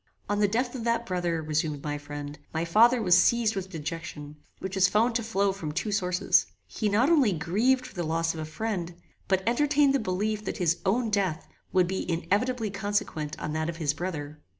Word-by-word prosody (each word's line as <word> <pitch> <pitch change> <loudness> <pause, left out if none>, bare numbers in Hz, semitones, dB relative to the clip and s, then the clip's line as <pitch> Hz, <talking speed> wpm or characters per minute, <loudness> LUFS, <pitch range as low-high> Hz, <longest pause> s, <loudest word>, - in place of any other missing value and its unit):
"On 205 0 0
the 205 - +4
death 245 +4 -1
of 250 -4 -5
that 235 0 0
brother," 175 -4 -1
resumed 150 -1 -1
my 145 -1 -3
friend, 145 0 -7 0.2
"my 160 +1 0
father 230 +8 +5
was 180 -3 +5
seized 235 -2 +2
with 190 -1 -4
dejection, 150 -2 -6 0.2
which 190 0 -6
was 190 -1 +4
found 225 +5 +2
to 230 - 0
flow 200 -3 +1
from 170 -6 -5
two 210 +7 -2
sources. 180 -3 +2 0.2
He 215 - -2
not 220 +6 +3
only 270 - +4
grieved 230 +11 +1
for 255 - -10
the 175 - -3
loss 165 0 0
of 160 - -7
a 155 - -3
friend, 175 0 -4 0.3
but 190 -1 +1
entertained 285 +3 +3
the 275 - +2
belief 210 +2 -1
that - - -3
his 170 -1 +1
own 225 +3 +1
death 190 -5 0 0.2
would 185 -2 +3
be 190 -1 -2
inevitably 215 +6 0
consequent 190 -7 -2
on 150 - -4
that 155 +1 -1
of 165 - -5
his 150 -4 0
brother. 150 -3 -5
190 Hz, 205 wpm, -27 LUFS, 160-220 Hz, 0.3 s, father